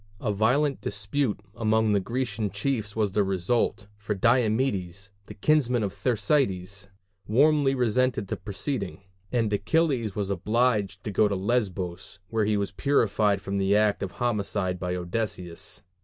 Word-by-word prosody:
A 110 - -1
violent 135 +8 +2
dispute 105 +3 -1
among 110 0 +2
the 100 - +3
Grecian 115 0 -2
chiefs 105 0 -2
was 105 -3 +1
the 105 +1 +2
result, 95 +3 0
for 105 0 -2
Diomedes, 105 -4 +1 0.2
the - - -9
kinsman 125 -2 +2
of 100 - -2
Thersites, 100 - 0 0.4
warmly 140 +4 +4
resented 125 -2 +1
the - - -3
proceeding; 100 -2 -4 0.3
and 115 -4 +1
Achilles 120 - +1
was 100 -1 -2
obliged 105 +1 0
to 105 - -3
go 105 +2 +4
to 100 - -1
Lesbos, 95 -4 -2
where 110 -2 +1
he 105 0 +1
was 100 -1 -2
purified 105 -5 +2
from 100 0 -2
the 100 +1 +2
act 105 -1 +2
of 95 -2 -4
homicide 100 -4 -1
by 90 0 -2
Odysseus. 90 -1 -4
105 Hz, 145 wpm, -26 LUFS, 100-120 Hz, 0.4 s, warmly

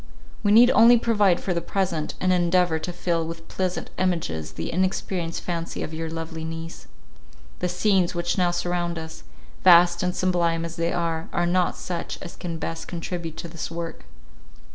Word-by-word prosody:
We 205 - +2
need 240 +4 +8
only 235 +2 +7
provide 210 -6 +3
for 185 - -2
the 170 - -1
present, 175 -6 -2
and 185 0 +2
endeavour 175 -2 +2
to 180 - -4
fill 170 -1 -1
with 165 0 -8
pleasant 185 -1 -3
images 80 - -1
the 80 - -4
inexperienced 185 -1 -1
fancy 170 -2 -3
of 155 - -6
your 160 0 -4
lovely 165 0 -5
niece. 165 0 -7 0.7
The 180 - -1
scenes 180 0 +2
which 175 0 0
now 180 -2 +2
surround 175 -1 -1
us, 160 0 -7 0.4
vast 175 -1 +7
and 180 -1 -1
sublime 170 -2 +1
as 165 0 -6
they 170 0 0
are, 165 -2 -2
are 175 - +1
not 180 +1 +1
such 175 -2 -4
as 170 - -9
can 170 -2 -5
best 165 0 -5
contribute 170 -1 -5
to - - -5
this 165 0 -6
work. 165 - -6
175 Hz, 175 wpm, -24 LUFS, 165-180 Hz, 0.7 s, need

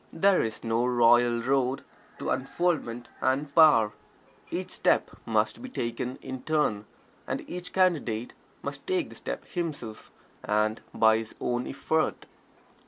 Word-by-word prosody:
There 190 +3 +4
is 110 -1 -3
no 115 +1 +1
royal 120 -1 +4
road 135 0 +1 0.3
to - - -3
unfoldment 135 -5 -1
and 140 +2 0
power 145 -10 +6 0.6
each - - -4
step - - +2 0.2
must 110 - +1
be 260 - -7
taken 125 - -3
in 130 -1 -6
turn, 150 -10 0 0.4
and - - -3
each 180 0 -6
Candidate 145 -12 +1 0.3
must - - -6
take 370 -3 0
the - - -11
step - - -5
himself, 150 - -5 0.3
and 105 +1 +1
by 110 0 +4
his 115 -1 -7
own 120 0 -1
effort. 160 +3 -1
125 Hz, 135 wpm, -28 LUFS, 115-160 Hz, 0.6 s, power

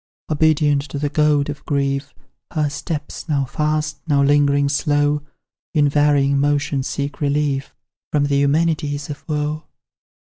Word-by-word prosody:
Obedient 150 -2 +3
to 140 0 -7
the 145 +1 -1
goad 150 -2 +2
of 145 -1 -6
grief, 140 0 -1 0.4
Her 150 -2 0
steps, 150 +1 -5
now 140 -3 +1
fast, 150 +2 -1
now 140 -2 +3
lingering 145 0 +3
slow, 145 0 +1 0.5
In 145 -1 +4
varying 145 -1 +3
motion 145 -1 +1
seek 140 +2 -4
relief 140 -1 0 0.4
From 145 -1 +2
the 140 -1 +1
Eumenides 145 0 0
of 145 - -8
woe. 150 +1 -2
145 Hz, 135 wpm, -20 LUFS, 140-150 Hz, 0.5 s, In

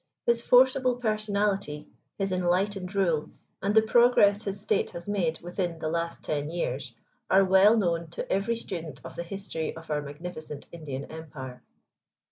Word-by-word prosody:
His 235 0 +3
forcible 255 +1 +5
personality, 205 -8 -1 0.3
his 195 -1 -1
enlightened 185 +2 0
rule, 170 -6 +1 0.3
and 200 +2 0
the 220 - +7
progress 220 -3 +5
his 200 0 -3
state 200 - 0
has 170 0 -9
made 175 -6 0
within 175 -1 -3
the 155 -1 -3
last 170 +1 -3
ten 150 -1 -2
years, 135 -7 -3 0.3
are 195 +1 +6
well 190 +4 +6
known 170 -5 0
to - - -3
every 200 +5 +1
student 170 -8 -6
of 165 - -8
the - - -3
history 170 -3 -5
of 165 -1 -9
our 150 0 +1
magnificent 150 0 -7
Indian 145 -5 -6
Empire. 140 -5 -8
180 Hz, 155 wpm, -28 LUFS, 160-205 Hz, 0.3 s, the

